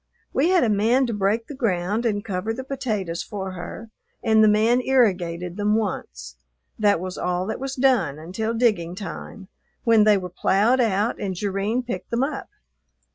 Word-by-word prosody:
We 295 Hz, +6 st, +2 dB
had 365 Hz, -5 st, +4 dB
a -, -, +3 dB
man 225 Hz, +6 st, +3 dB
to 235 Hz, -, -3 dB
break 205 Hz, +3 st, 0 dB
the 290 Hz, -, -8 dB
ground 215 Hz, -2 st, 0 dB
and 205 Hz, -1 st, -2 dB
cover 205 Hz, +2 st, -2 dB
the 260 Hz, -, -5 dB
potatoes 215 Hz, -11 st, -3 dB
for 190 Hz, -2 st, -5 dB
her 185 Hz, +5 st, -8 dB, 0.3 s
and 220 Hz, -1 st, +4 dB
the -, -, +6 dB
man 220 Hz, +4 st, +3 dB
irrigated 180 Hz, -9 st, +1 dB
them 210 Hz, +1 st, +2 dB
once. 60 Hz, -, -4 dB, 0.4 s
That 205 Hz, -4 st, +3 dB
was 185 Hz, +1 st, -5 dB
all 180 Hz, 0 st, -1 dB
that 220 Hz, -, -4 dB
was 270 Hz, 0 st, -4 dB
done 255 Hz, -, +2 dB
until 190 Hz, +8 st, -3 dB
digging 205 Hz, -8 st, +1 dB
time, 195 Hz, 0 st, -8 dB, 0.4 s
when 225 Hz, -2 st, +5 dB
they 210 Hz, -1 st, +5 dB
were 180 Hz, -1 st, -5 dB
ploughed 215 Hz, +10 st, +3 dB
out 215 Hz, 0 st, 0 dB
and 190 Hz, -2 st, -2 dB
Jerrine 205 Hz, +5 st, -1 dB
picked 190 Hz, -7 st, -5 dB
them 235 Hz, +2 st, 0 dB
up. 275 Hz, 0 st, -4 dB
210 Hz, 180 wpm, -23 LUFS, 185-235 Hz, 0.4 s, the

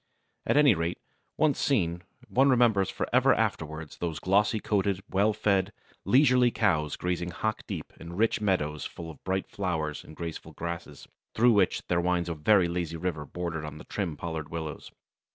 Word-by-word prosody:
At -, -, +3 dB
any 145 Hz, -5 st, +7 dB
rate, 85 Hz, 0 st, -2 dB, 0.4 s
once 155 Hz, -3 st, +2 dB
seen, 90 Hz, -10 st, +1 dB, 0.3 s
one 135 Hz, +2 st, +3 dB
remembers 115 Hz, -7 st, +4 dB
for -, -, -3 dB
ever -, -, +5 dB
afterwards 80 Hz, -1 st, -3 dB
those 85 Hz, -3 st, -2 dB
glossy 100 Hz, +6 st, +2 dB
coated, 100 Hz, -2 st, 0 dB
well 100 Hz, +3 st, +3 dB
fed, 100 Hz, -2 st, +1 dB, 0.3 s
leisurely 125 Hz, -2 st, +5 dB
cows 80 Hz, -10 st, +1 dB
grazing 90 Hz, -1 st, -2 dB
hock 110 Hz, +5 st, -2 dB
deep -, -, -6 dB
in 85 Hz, +1 st, -8 dB
rich 110 Hz, +3 st, +1 dB
meadows 75 Hz, -8 st, 0 dB
full 85 Hz, -1 st, -7 dB
of 75 Hz, -, -17 dB
bright 95 Hz, 0 st, -1 dB
flowers 80 Hz, -6 st, -3 dB
and 80 Hz, -, -13 dB
graceful 85 Hz, -1 st, -6 dB
grasses, 85 Hz, -4 st, -6 dB, 0.3 s
through 120 Hz, +2 st, +5 dB
which 100 Hz, -3 st, +2 dB
there 85 Hz, -1 st, +1 dB
winds 90 Hz, -1 st, 0 dB
a -, -, -1 dB
very 85 Hz, +4 st, +4 dB
lazy 85 Hz, -1 st, -3 dB
river 80 Hz, -4 st, -3 dB
bordered 85 Hz, -1 st, -4 dB
by 75 Hz, 0 st, -8 dB
trim 90 Hz, -7 st, -3 dB
pollarded 80 Hz, -2 st, -5 dB
willows. 80 Hz, -2 st, -6 dB
90 Hz, 170 wpm, -28 LUFS, 80-105 Hz, 0.4 s, any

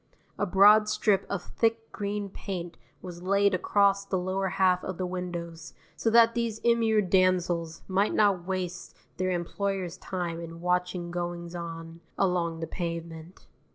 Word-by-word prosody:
A 205 Hz, -, +1 dB
broad 210 Hz, +3 st, +6 dB
strip 205 Hz, -2 st, +1 dB
of 200 Hz, -3 st, -3 dB
thick 225 Hz, 0 st, -1 dB
green 205 Hz, 0 st, -3 dB
paint 180 Hz, -3 st, -6 dB, 0.3 s
was 175 Hz, -2 st, -8 dB
laid 200 Hz, +2 st, +2 dB
across 200 Hz, +1 st, +2 dB
the 195 Hz, -1 st, -2 dB
lower 185 Hz, +1 st, -1 dB
half 185 Hz, -1 st, +2 dB
of 185 Hz, -2 st, -5 dB
the 185 Hz, -, -2 dB
windows 170 Hz, -2 st, -6 dB, 0.2 s
so 225 Hz, -, 0 dB
that 230 Hz, 0 st, +6 dB
these 230 Hz, -2 st, -1 dB
immured 225 Hz, -4 st, +2 dB
damsels 175 Hz, -3 st, +1 dB
might 195 Hz, +2 st, +1 dB
not 195 Hz, -5 st, +3 dB
waste 185 Hz, -1 st, -4 dB, 0.2 s
their 185 Hz, 0 st, 0 dB
employers' 185 Hz, 0 st, -2 dB
time 175 Hz, -3 st, -4 dB
in 165 Hz, 0 st, -8 dB
watching 180 Hz, 0 st, -1 dB
goings 175 Hz, -1 st, -4 dB
on 165 Hz, -1 st, -7 dB, 0.2 s
along 170 Hz, -3 st, 0 dB
the 165 Hz, -, -3 dB
pavement. 170 Hz, 0 st, -6 dB
185 Hz, 150 wpm, -28 LUFS, 170-200 Hz, 0.3 s, broad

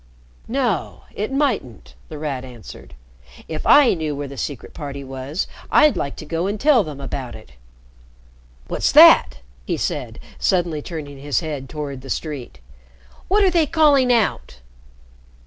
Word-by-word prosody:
"No, 240 Hz, -, -2 dB
it 210 Hz, +5 st, -4 dB
mightn't," 265 Hz, -, -2 dB, 0.2 s
The 155 Hz, -, -7 dB
Rat 145 Hz, -4 st, -4 dB
answered. 120 Hz, -, -12 dB, 0.5 s
"If 155 Hz, -1 st, -5 dB
I 285 Hz, -4 st, +7 dB
knew 155 Hz, -4 st, -3 dB
where 145 Hz, 0 st, -5 dB
the 140 Hz, -, -9 dB
Secret 135 Hz, -1 st, -6 dB
Party 140 Hz, -2 st, -7 dB
was, 135 Hz, +5 st, -4 dB, 0.2 s
I'd 300 Hz, -1 st, +5 dB
like 140 Hz, -, -3 dB
to -, -, -9 dB
go 165 Hz, +4 st, -2 dB
and 205 Hz, +1 st, -3 dB
tell 275 Hz, -4 st, +4 dB
them 150 Hz, -4 st, -8 dB
about 135 Hz, -2 st, -6 dB
it. 110 Hz, -, -14 dB, 1.2 s
What's -, -, 0 dB
that!" -, -, +7 dB, 0.2 s
he -, -, -2 dB
said, -, -, -4 dB, 0.2 s
suddenly 175 Hz, -5 st, 0 dB
turning 145 Hz, -4 st, -8 dB
his 145 Hz, +3 st, -1 dB
head 145 Hz, -5 st, -5 dB
toward 140 Hz, -3 st, -6 dB
the 135 Hz, -, -11 dB
street. 135 Hz, -, -5 dB, 0.7 s
"What 410 Hz, +2 st, +3 dB
are 380 Hz, -, +4 dB
they 335 Hz, -3 st, +2 dB
calling 285 Hz, -6 st, +4 dB
out?" 215 Hz, -, 0 dB
155 Hz, 150 wpm, -21 LUFS, 140-230 Hz, 1.2 s, I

